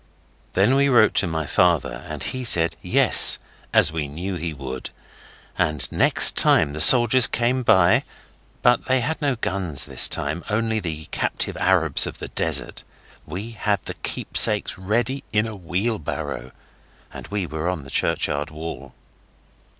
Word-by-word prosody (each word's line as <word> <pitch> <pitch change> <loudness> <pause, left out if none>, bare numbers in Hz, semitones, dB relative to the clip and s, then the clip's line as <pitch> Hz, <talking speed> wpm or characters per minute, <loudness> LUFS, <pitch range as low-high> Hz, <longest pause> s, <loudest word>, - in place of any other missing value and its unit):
Then 100 +7 +2
we 140 +1 +2
wrote 120 -5 +4
to 95 - +2
my 80 -2 -3
father, 75 -7 0
and - - -6
he 130 0 -4
said 85 -8 +3
'Yes', - - +5 0.3
as 80 - +3
we 80 -2 -4
knew 85 +7 -6
he 85 -1 -5
would, 65 -3 -8 0.7
and 75 -3 -1
next - - +4
time 70 - +3
the 80 - -3
soldiers 120 +4 +7
came 120 +2 -1
by 95 -7 +3 0.6
but 120 0 +2
they 130 0 0
had 160 +7 -4
no 140 -3 0
guns 95 - -2
this - - +3
time, 80 +5 -4
only 110 +1 -1
the 80 -5 -6
captive - - -3
Arabs 90 -5 +1
of - - -8
the - - -8
desert - - -3 0.4
we 105 +6 -7
had 105 -3 -2
the - - -6
keepsakes 105 -1 0
ready 120 +8 -2
in 105 0 +1
a 110 -1 -7
wheelbarrow, 85 - -4 0.6
and - - -10
we 100 -2 -3
were 80 +1 -4
on 90 -6 -5
the 65 - -13
churchyard 70 +1 -1
wall. 75 -4 -9
90 Hz, 155 wpm, -21 LUFS, 80-115 Hz, 0.7 s, soldiers